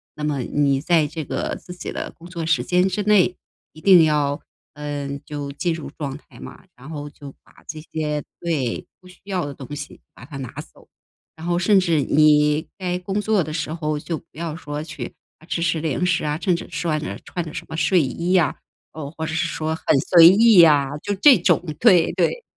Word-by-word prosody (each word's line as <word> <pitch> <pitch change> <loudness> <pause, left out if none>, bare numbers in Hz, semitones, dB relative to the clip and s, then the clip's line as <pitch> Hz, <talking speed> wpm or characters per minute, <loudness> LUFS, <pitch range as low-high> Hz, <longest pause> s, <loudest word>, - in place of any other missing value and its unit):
那 150 - -7
么 145 -3 -1
你 140 +1 +1
在 160 0 +2
这 155 -1 -6
个 - - -3
自 180 - -10
己 180 - -6
的 - - -5
工 170 - -15
作 170 -3 -5
时 160 -1 +1
间 180 +1 +2
之 200 +2 -2
内， 190 -3 +3 0.4
一 155 - -14
定 180 -5 +7
要， 145 -1 0 0.3
嗯， 145 -1 -5
就 145 -1 -5
进 170 +4 -1
入 150 -4 -7
状 140 -2 -4
态 - - -18
嘛。 - - -11
然 135 +5 -12
后 145 -2 -6
就 140 -1 -12
把 - - -23
这 155 -1 -7
些， 150 -2 -3 0.2
对， 150 -9 -2
不 185 - -17
需 180 - -17
要 185 -5 -2
的 145 - -6
东 140 +2 -8
西 - - -8
把 - - -15
它 145 -4 -9
拿 130 -3 -6 0.2
走。 - - -21 0.5
然 160 +1 -10
后 175 0 0
甚 200 +2 +4
至 165 -4 +1
你 150 +2 +3
该 180 -2 -2
工 195 +3 -3
作 210 -4 +1
的 155 - -6
时 155 0 -3
候， 155 -2 -2
就 165 +1 -4
不 - - -16
要 165 -1 -5
说 145 -2 -6
去 155 - -7 0.4
吃 170 - -1
吃 165 -2 0
零 165 +3 -1
食 180 -3 +1
啊， 150 +1 -2
甚 180 -4 +2
至 - - -6
穿 155 0 -1
着 - - -5
穿 175 - -4
着 155 - -8
什 - - -6
么 - - -5
睡 180 0 +3
衣 170 +7 -1
啊， 165 - +2 0.4
哦， 150 -3 -7
或 160 - -3
者 160 - -4
是 170 +1 0
说 160 -1 -3
很 - - -14 0.3
随 170 -2 +9
意 210 0 +7
啊， 145 -2 +3
就 205 -1 -2
这 265 +4 +7
种。 175 0 +2 0.2
对 185 -8 +5
对。 480 -1 0
160 Hz, 235 characters per minute, -22 LUFS, 150-180 Hz, 0.5 s, 随